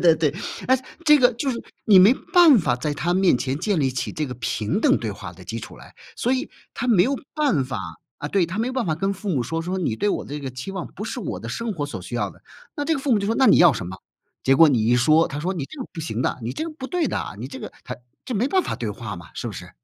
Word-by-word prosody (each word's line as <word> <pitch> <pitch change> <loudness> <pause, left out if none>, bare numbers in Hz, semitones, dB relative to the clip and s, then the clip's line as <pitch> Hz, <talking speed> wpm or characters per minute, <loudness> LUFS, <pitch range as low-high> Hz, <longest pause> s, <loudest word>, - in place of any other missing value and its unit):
对 155 -3 +1
对， 170 - -9 0.3
哎， 260 +1 +5 0.3
这 300 -1 +8
个 250 -2 +5
就 270 +4 -2
是 235 - -4 0.2
你 200 -4 +8
没 200 +7 +7 0.2
办 340 -7 +8
法 140 - +1
在 150 +3 -2
他 170 +4 -1
面 185 -8 +4
前 130 +2 -2
建 195 +4 0
立 135 -2 +2
起 130 -1 -3
这 155 - -2
个 125 - -6
平 115 - -1
等 275 +2 +4
对 - - -3
话 - - -8
的 - - -14
基 - - -5
础 - - -10
来， - - -15 0.2
所 245 - 0
以 265 +3 -1 0.2
他 245 - -3
没 200 -7 +5
有 270 - +1 0.2
办 280 - +2
法 130 -1 -4 0.4
啊， 145 - -3
对， 190 0 +2
他 170 +4 -6
没 235 +3 0
办 255 -4 -1
法 155 - 0
跟 195 +5 -1
父 200 +1 -6
母 140 -9 +1
说， 165 +7 -3
说： 180 +3 -3
“你 145 -11 -1
对 205 - 0
我 - - -1
这 145 +1 -5
个 135 -2 -5
期 130 +9 -7
望 190 -3 -5
不 205 - -8
是 235 +4 -4
我 195 - -4
的 115 - -7
生 225 - -3
活 145 -4 -3
所 145 - -7
需 - - -6
要 - - -1
的。” - - -18 0.4
那 290 - -1
这 325 - +2
个 280 - -1
父 270 -1 -1
母 215 - +4
就 200 - -2
说： 225 +3 0
“那 265 - +4
你 - - +7
要 170 -5 +7
什 95 - -5
么？” 95 +2 -7 0.5
结 135 - +4
果 160 +2 +7
你 115 -6 +2
一 120 - +4
说， 155 +7 +4
他 145 -2 -5
说： 185 +4 -1
“你 150 -6 -3
这 305 - -12
个 - - -5
不 170 - -8
行 125 -7 -3
的， - - -1
你 115 +2 -4
这 - - -3
个 330 - -4
不 270 -4 -7
对 355 -4 0
的， - - -3
你 120 - -6
这 140 - -8
个” - - -7
他 125 - -6 0.3
这 255 - -5
没 230 +4 +1
办 375 +4 +2
法 - - -3
对 115 - -3
话 105 -1 -6
嘛， 85 - -11
是 - - -6
不 - - -3
是？ - - -9
175 Hz, 325 characters per minute, -23 LUFS, -, 0.5 s, 这